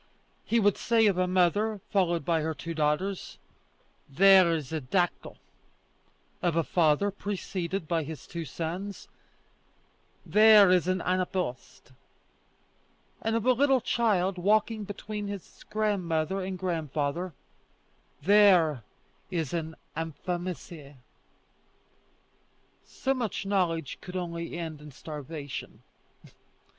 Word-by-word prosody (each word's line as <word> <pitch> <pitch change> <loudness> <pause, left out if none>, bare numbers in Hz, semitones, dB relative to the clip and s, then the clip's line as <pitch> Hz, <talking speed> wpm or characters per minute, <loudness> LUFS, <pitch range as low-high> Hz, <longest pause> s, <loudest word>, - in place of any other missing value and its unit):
He 235 - +1
would 205 -2 +3
say 230 -1 +3
of 195 -3 +2
a 185 - +2
mother 195 +4 +2
followed 175 -6 +1
by 165 -1 +1
her 160 +1 -2
two 165 +2 -6
daughters, 160 +5 -1 0.7
There 190 +3 +6
is 155 -3 -3
a 160 - -2
dactyl; 175 +7 -1 1.0
of 175 -2 +1
a 165 - +2
father 165 +4 +2
preceded 190 -3 -4
by 165 0 +1
his 155 -2 -8
two 170 -1 -6
sons, 175 +6 -5 1.2
There 210 -2 +7
is 180 -1 +3
an 185 -1 0
anapæst; 180 -8 -3 1.3
and 225 0 0
of 230 0 -1
a 255 - +5
little 270 +1 +3
child 195 -6 +1
walking 215 +3 +1
between 205 +1 -6
its 200 -3 -9
grandmother 195 -4 -1
and 185 0 -4
grandfather, 165 -1 -2 0.9
There 180 - +5 0.5
is 165 -6 -2
an 160 -1 -3 0.2
amphimacer. 165 -2 -5 1.9
So 270 - -2
much 235 -6 -3
knowledge 170 -7 -1
could 180 0 -9
only 170 -2 -4
end 160 -3 -6
in 150 - -10
starvation. 145 -1 -8
180 Hz, 110 wpm, -28 LUFS, 160-200 Hz, 1.9 s, There